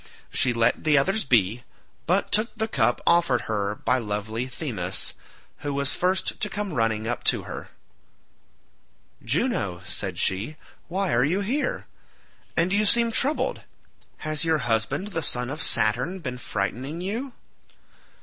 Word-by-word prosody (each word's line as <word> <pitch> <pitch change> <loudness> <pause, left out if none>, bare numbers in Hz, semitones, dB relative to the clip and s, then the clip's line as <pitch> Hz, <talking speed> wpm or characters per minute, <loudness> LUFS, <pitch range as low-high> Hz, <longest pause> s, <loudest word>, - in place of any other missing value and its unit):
She 125 - +2
let 115 -1 +2
the 150 -2 +4
others 195 +10 +2
be, 115 -2 +3 0.5
but 185 +4 +2
took 215 +3 +2
the 220 - -1
cup 120 - +1
offered 170 -8 +4
her 105 -1 -2
by 125 +4 +1
lovely 110 +2 -3
Themis, 115 - -3 0.5
who 145 -1 -3
was 140 0 +1
first 185 +4 0
to 210 - 0
come 205 -3 -3
running 115 -3 0
up 120 - -2
to - - +3
her. - - -7 1.5
"Juno," 115 - 0
said - - -4
she, 100 +11 0 0.3
"why 190 +1 0
are 120 +1 +4
you 175 +8 +1
here? 290 - -1 0.7
And 175 +3 +2
you 205 +1 +3
seem 235 +2 +6
troubled—has 165 - -1
your 160 -1 +2
husband 120 - 0
the 165 -5 -2
son 125 -3 -1
of 155 +2 -2
Saturn 120 - +1
been 130 -8 -5
frightening 125 +9 -3
you?" 235 +8 -3
140 Hz, 140 wpm, -25 LUFS, 115-190 Hz, 1.5 s, seem